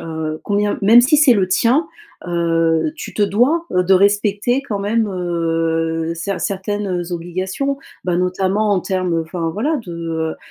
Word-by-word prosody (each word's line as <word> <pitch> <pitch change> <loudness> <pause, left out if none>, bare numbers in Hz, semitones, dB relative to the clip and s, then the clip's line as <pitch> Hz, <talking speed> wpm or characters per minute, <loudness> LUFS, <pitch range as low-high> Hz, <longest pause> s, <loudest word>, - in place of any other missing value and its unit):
heu, 160 -1 -5
combien 205 0 0
même 225 +4 +7
si 260 +5 +3
c'est 285 -4 +6
le 190 -3 +1
tien, 250 - +2 0.4
heu, 165 - +1
tu 325 - -8
te 210 - 0
dois 250 +12 +2
de 180 +1 +3
respecter 205 +6 +2
quand 215 -7 -4
même, 215 +2 0
heu, 165 -2 -1
cert 180 +3 -4
certaines 195 -2 -2
obligations. 185 +11 -3 0.3
Bah, 180 -1 0
notamment 190 +4 0
en 200 - +3
termes, 180 -3 -1
enfin 165 0 -3
voilà, 265 - -1
de, 165 -2 -4
185 Hz, 150 wpm, -18 LUFS, 170-210 Hz, 0.4 s, même